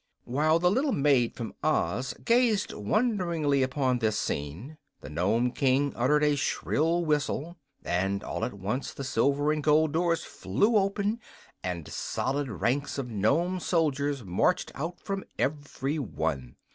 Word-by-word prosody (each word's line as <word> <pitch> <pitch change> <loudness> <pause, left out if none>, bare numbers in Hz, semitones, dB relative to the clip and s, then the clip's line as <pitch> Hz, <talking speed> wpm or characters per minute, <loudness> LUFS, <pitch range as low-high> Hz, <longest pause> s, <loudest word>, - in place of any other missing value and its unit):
While 155 +6 +2
the 180 +1 +3
little 265 +5 +1
maid 135 -5 +3
from 115 -2 -5
Oz 130 -5 0
gazed 230 -3 +3
wonderingly 170 - +1
upon 130 -1 +1
this 110 -2 +1
scene 90 - -4 0.2
the - - -9
Nome 105 +10 +1
King 135 +2 +1
uttered 150 +5 +2
a 150 -1 +3
shrill 165 +4 0
whistle, 150 +2 -1 0.3
and 95 +3 0
at - - -3
once 105 +7 -3
all - - -10
the 140 - -5
silver 140 +4 +1
and 155 0 -1
gold 155 +1 +4
doors 170 0 +1
flew 220 +3 0
open 205 +2 +1 0.4
and 90 -4 -4
solid 135 +1 -2
ranks 130 - -1
of 125 -3 -4
Nome 155 - +1
soldiers 145 -6 0
marched 90 -2 +1
out 165 +5 -5
from 195 -1 -4
every 145 +1 -2
one. 80 - -3
145 Hz, 145 wpm, -28 LUFS, 120-165 Hz, 0.4 s, gold